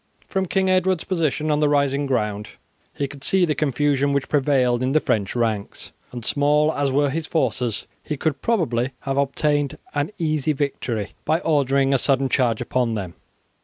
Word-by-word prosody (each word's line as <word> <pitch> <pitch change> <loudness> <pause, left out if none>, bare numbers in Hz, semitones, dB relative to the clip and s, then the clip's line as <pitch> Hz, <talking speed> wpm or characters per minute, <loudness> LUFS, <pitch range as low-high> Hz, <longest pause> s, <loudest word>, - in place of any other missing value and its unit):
From 190 -1 -1
King 190 +1 +1
Edward's 185 -2 +2
position 155 -4 0
on 150 - +2
the 150 -1 +3
rising 140 -1 +1
ground 105 -5 -1 0.4
he 140 - -3
could 140 0 -12
see 190 +2 +3
the 155 - 0
confusion 140 -1 +1
which 140 -1 -1
prevailed 130 -4 +2
in 130 +1 0
the 155 - +5
French 105 -7 -1
ranks, 110 -4 -2 0.2
and 120 -2 -7
small 150 +2 +2
as 140 -1 0
were 140 +1 +2
his 160 +2 -3
forces 125 -7 -1 0.2
he 150 - -4
would 155 -3 0
probably 130 - 0
have 135 0 -3
obtained 145 0 0 0.2
an 145 0 -1
easy 155 -3 0
victory 125 -7 -3
by 160 - +2
ordering 140 -3 +2
a 135 - +3
sudden 135 0 +2
charge 120 -5 +1
upon 120 -1 0
them. 95 -5 -5
140 Hz, 175 wpm, -22 LUFS, 125-150 Hz, 0.4 s, the